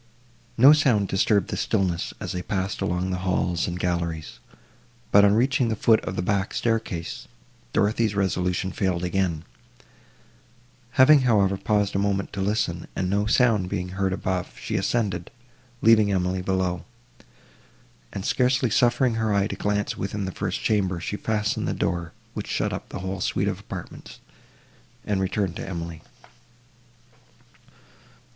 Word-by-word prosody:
No 135 +5 +9
sound 125 -10 +3
disturbed 100 +1 +2
the - - -3
stillness, 90 -3 0
as - - -4
they 90 - -3
passed 95 0 -3
along 90 +2 -1
the 90 - -2
halls 90 -2 0
and 90 0 -4
galleries; 85 -6 -2 0.7
but, 100 - +7
on 100 0 +5
reaching 130 +1 +2
the 110 - 0
foot 110 +1 +4
of - - -4
the 90 - -2
back 100 0 -1
staircase, 110 -8 -2 0.4
Dorothée's 110 - +1
resolution 95 -1 0
failed 90 -3 -1
again; 90 -3 -1 1.5
having, 140 +3 +7
however, 100 -6 +3
paused 100 0 0
a - - +2
moment 100 -1 -1
to 100 - -3
listen, 95 -4 -1
and 95 0 -1
no 100 +1 +1
sound 110 -5 +3
being 90 -2 -3
heard 95 +1 -1
above, 95 -1 -3
she - - -4
ascended, 95 -3 -1 0.5
leaving 110 -2 +5
Emily 90 -1 0
below, 90 -1 -1 1.3
and, 100 - -5
scarcely 125 -1 +2
suffering 120 +2 +3
her 110 -1 +1
eye 100 -1 +2
to - - -4
glance 105 0 -1
within 100 +1 -3
the 95 - -3
first 95 0 -3
chamber, 95 -5 +1
she 100 - -4
fastened 105 -1 -1
the - - -1
door, 85 -1 -2 0.2
which - - -5
shut - - -1
up - - -6
the - - -6
whole 95 0 -4
suite - - 0
of - - -2
apartments, - - -9 0.9
and 100 -2 0
returned 95 -2 -1
to - - -6
Emily. 85 -3 -6
95 Hz, 150 wpm, -25 LUFS, 90-105 Hz, 1.5 s, No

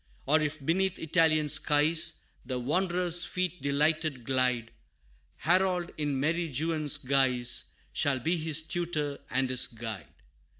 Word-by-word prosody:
Or 155 +3 +3
if 155 +1 -2
beneath 190 +4 +1
Italian 160 -2 +2
skies, 155 +3 +2 0.2
The 130 0 -3
wanderer's 175 +5 +1
feet 180 0 -3
delighted 150 -1 0
glide, 125 -2 0 0.6
Harold, 180 +1 +1
in 145 -3 -1
merry 165 +3 0
Juan's 155 +1 0
guise, 130 -3 +1 0.2
Shall 140 -2 +1
be 160 +8 0
his 160 -1 0
tutor 160 -4 -2
and 130 +1 +1
his 130 0 +1
guide. 110 -3 -7
150 Hz, 125 wpm, -29 LUFS, 135-170 Hz, 0.6 s, Or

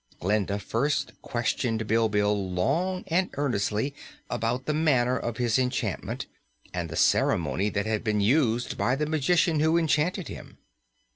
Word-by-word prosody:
Glinda 100 +1 0
first 130 +8 -1
questioned 115 -1 -1
Bilbil 105 -2 +2 0.2
long 170 - 0
and 180 +3 +1
earnestly 125 -1 -1 0.4
about 120 +2 -1
the 155 - 0
manner 130 -5 +2
of 120 -3 -3
his 120 0 +1
enchantment 125 -1 -2 0.5
and 85 -2 -3
the - - -6
ceremony 100 +3 +2
that 100 0 -2
had 110 -1 -1
been 105 -2 +1
used 120 +1 +1
by 125 - +2
the 150 +2 -1
magician 160 +1 +2
who 160 +2 +3
enchanted 165 +2 +1
him. - - -10
120 Hz, 140 wpm, -27 LUFS, 110-150 Hz, 0.5 s, who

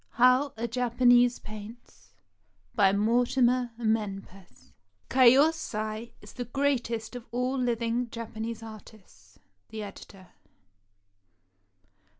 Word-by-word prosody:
HOW 255 +4 +4
A 235 +1 -2
JAPANESE 245 0 +3
PAINTS 205 - -12 0.6
BY 195 -2 +4
MORTIMER 245 +3 +2
MENPES 200 -4 -4 0.4
[KiYOSAi 240 -4 +2
is 210 - -13
the 245 - -5
greatest 240 -3 -2
of 245 -1 -9
all 250 +2 -1
living 240 -1 -1
Japanese 225 0 -6
artists. 205 - -14 0.3
The 220 -1 -6
Editor. 195 -2 -12
230 Hz, 90 wpm, -28 LUFS, 215-245 Hz, 0.6 s, HOW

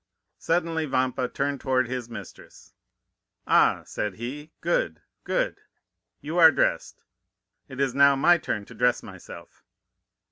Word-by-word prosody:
Suddenly 165 -2 -1
Vampa 130 -1 0
turned 140 +1 -3
toward 130 -2 +1
his 125 -2 -5
mistress: 115 - -12 0.7
"'Ah,' - - +3
said 105 -3 -4
he—'good, 135 - -3 0.3
good! - - -1 0.6
You 155 +5 -3
are 160 -1 +9
dressed; - - -1 0.7
it 130 - -9
is 135 -2 +1
now 140 +1 +5
my 170 +6 +4
turn 105 -9 -3
to - - -13
dress 125 0 +1
myself. - - -12
135 Hz, 120 wpm, -25 LUFS, 125-155 Hz, 0.7 s, are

